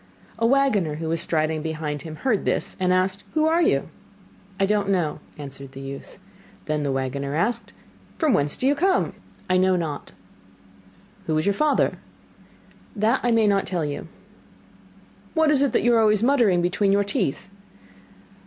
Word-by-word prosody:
A 230 - +3
waggoner 230 - +2
who 160 +1 -5
was 165 0 0
striding 155 -1 0
behind 155 -2 -4
him 155 0 -8
heard 225 +3 0
this - - -1
and 180 -1 +1
asked: 185 +1 +1
'Who 310 0 +3
are 325 +2 +3
you?' 330 - +1 0.7
'I 195 - +4
don't 205 0 0
know,' 175 -6 0 0.2
answered 140 -2 -9
the 135 - -9
youth. 135 0 -8 0.5
Then 155 -1 -1
the 140 -1 -1
waggoner 135 +2 -2
asked: 230 +8 -1 0.5
'From 310 -6 +2
whence 145 0 +1
do - - -2
you 275 - +4
come?' 370 +6 +1 0.3
'I 185 - +2
know 185 0 +3
not.' 160 -5 -4 1.2
'Who 155 -1 +1
is 155 - 0
your 200 - +3
father?' 300 +7 +1 1.0
'That 220 +4 +2
I 245 - 0
may 225 -2 +3
not 200 -1 +2
tell 175 -4 -1
you.' 145 +2 -5 1.3
'What 320 -1 +4
is 280 -2 +3
it 280 - +2
that - - +1
you 240 - +4
are 230 - +4
always 215 -1 +3
muttering 235 -10 +3
between 195 +3 +1
your 200 +1 +3
teeth? 195 - -2
190 Hz, 170 wpm, -23 LUFS, 155-235 Hz, 1.3 s, I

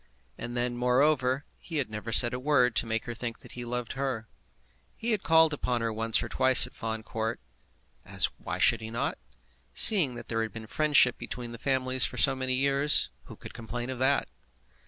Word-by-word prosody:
And 120 +1 -7
then, 120 0 -2
moreover, 130 +2 +1
he 165 - -7
had 135 -6 -2
never 110 +1 -6
said 120 +1 +5
a 125 - -4
word 125 -4 +1
to 115 - +2
make 115 +1 -3
her 120 - -5
think 115 0 -6
that - - -13
he 120 - -7
loved 120 0 -5
her. 130 -5 -4 0.7
He 235 +1 -3
had 215 -3 0
called 160 -1 +3
on 125 -2 -1
her 115 -1 -2
once 115 0 +2
or - - -5
twice 130 -1 +4
at - - -14
Fawn 110 -1 -5
Court, 110 +1 -4 0.6
as - - -1
why 80 - -5
should 100 +5 +3
he 110 - -7
not? 115 - -3 0.6
Seeing 165 - +6
that - - -10
there 115 -1 -2
had 110 -3 -5
been 115 -1 -8
friendship 145 0 +2
between 120 -1 -7
the 115 - -10
families 130 -1 +2
for - - 0
so 135 -2 +4
many 130 -1 -2
years, 140 +2 +2
who - - -12
could - - -12
complain 120 +2 -6
of 130 - -7
that? 135 +2 +1
125 Hz, 205 wpm, -27 LUFS, 115-135 Hz, 0.7 s, Seeing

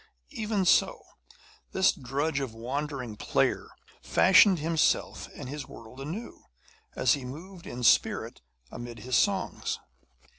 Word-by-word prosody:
Even 215 -6 -1
so, - - +3 0.7
this 190 - +4
drudge 140 +4 -2
of 130 -5 -5
wandering 130 0 -4
players - - 0 0.3
fashioned 190 +1 +6
himself 160 +1 0
and - - -7
his 145 +1 -6
world 115 +3 -12
anew, 175 +12 -7 0.5
as 125 - +3
he 140 - -3
moved 170 +8 -9
in 125 +1 -6
spirit 115 - +2 0.3
amid 120 -1 -8
his 125 +2 -1
songs. - - 0
140 Hz, 120 wpm, -28 LUFS, 125-175 Hz, 0.7 s, fashioned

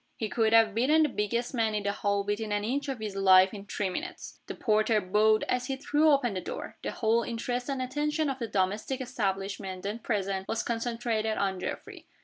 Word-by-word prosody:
He 220 - -3
could 220 -1 +1
have 225 -2 +5
beaten 285 +8 +4
the 300 - +2
biggest 235 +3 -2
man 225 -3 +1
in 210 - -1
the 200 - 0
hall 200 0 0
within 205 +1 -2
an 205 0 0
inch 275 +6 -2
of 270 - -2
his 215 -3 -5
life 190 -1 +6
in 200 -1 -8
three 205 -1 -2
minutes. 350 - -6
The - - -5
porter 215 0 +2
bowed 210 +3 +3
as 250 0 -1
he 270 - -1
threw 295 +3 +2
open 275 -7 +3
the 185 - -3
door. - - -6
The - - -3
whole 230 0 +1
interest 245 +2 -3
and 270 -2 -1
attention 295 +4 -1
of 270 -1 -3
the 230 - -2
domestic 205 +6 -1
establishment 195 -6 -3
then 210 +3 -3
present 195 -4 -2
was 225 - -1
concentrated 230 -2 -1
on 195 -2 -1
Geoffrey. - - -6
220 Hz, 210 wpm, -29 LUFS, 200-250 Hz, -, life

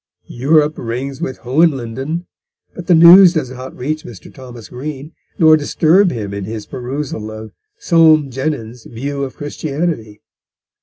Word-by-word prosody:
Europe 150 +4 +1
rings 130 +3 -5
with 130 - -4
Hohenlinden, 135 +2 -1 0.5
but 175 -2 -10
the 175 - +5
news 175 +2 +8
does 150 -7 -2
not 130 0 -9
reach 155 +5 -3
Mr. 110 -6 -12
Thomas 125 -4 -11
Green, 140 +3 -7 0.3
nor 160 -1 +6
disturb 165 +5 +2
him 105 -8 -5
in 100 -1 -5
his 110 0 -6
perusal 130 -3 -6
of 110 0 -9 0.3
Soame 160 - +3
Jenyns' 125 -4 -5
View 140 +4 -5
of 130 - -6
Christianity. 145 -7 -4
135 Hz, 140 wpm, -16 LUFS, 120-155 Hz, 0.5 s, news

